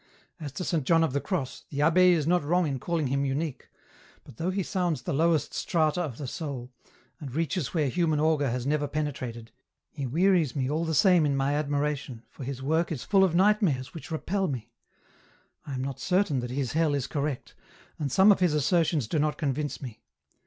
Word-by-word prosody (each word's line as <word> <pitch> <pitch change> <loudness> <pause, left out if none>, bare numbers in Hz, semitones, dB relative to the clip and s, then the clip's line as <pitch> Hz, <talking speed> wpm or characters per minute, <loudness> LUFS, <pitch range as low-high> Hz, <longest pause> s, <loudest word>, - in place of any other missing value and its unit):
As 150 -3 -6
to 180 - -4
Saint 165 -5 0
John 165 +2 +4
of 160 - 0
the 140 - 0
Cross, 170 -10 -4
the 145 0 -1
abbe 180 +3 +5
is 155 -4 +1
not 175 0 +2
wrong 175 +4 +2
in 135 -3 -2
calling 165 +2 -1
him 135 +1 0
unique, 140 +1 -3 0.5
but - - -15
though 170 - -1
he 190 +1 -1
sounds 175 -4 -1
the - - -2
lowest 160 +1 +1
strata 160 +1 +1
of 140 -9 -4
the 145 - -5
soul, 130 -3 -5 0.5
and 140 -5 -8
reaches 165 -1 -2
where 155 -3 +2
human 160 +1 +1
auger 150 -3 +2
has 125 +1 -3
never 145 +1 0
penetrated, 130 -6 -4 0.4
he 140 -4 -4
wearies 170 0 +2
me 130 -3 0
all 155 +4 -1
the 160 -1 -1
same 180 0 +5
in 140 -2 +1
my 135 +1 +1
admiration, 145 -4 -2
for - - -9
his 130 0 -5
work 160 +5 +1
is 145 -6 -3
full 195 -1 +4
of 180 -3 +2
nightmares 185 - +2
which 165 - -9
repel 190 +4 -1
me; 120 -6 -5 1.0
I 140 - -4
am 130 - -3
not 135 -1 -5
certain 180 -7 +1
that 120 0 -4
his 130 -1 -2
hell 160 -2 +2
is 135 -3 -1
correct, 145 -2 -3 0.5
and 145 -3 -2
some 190 +7 +6
of 200 - +3
his 175 -4 +2
assertions 155 - +1
do 155 - 0
not 150 0 0
convince 145 -1 -2
me. 120 -5 -8
150 Hz, 210 wpm, -27 LUFS, 135-170 Hz, 1.0 s, some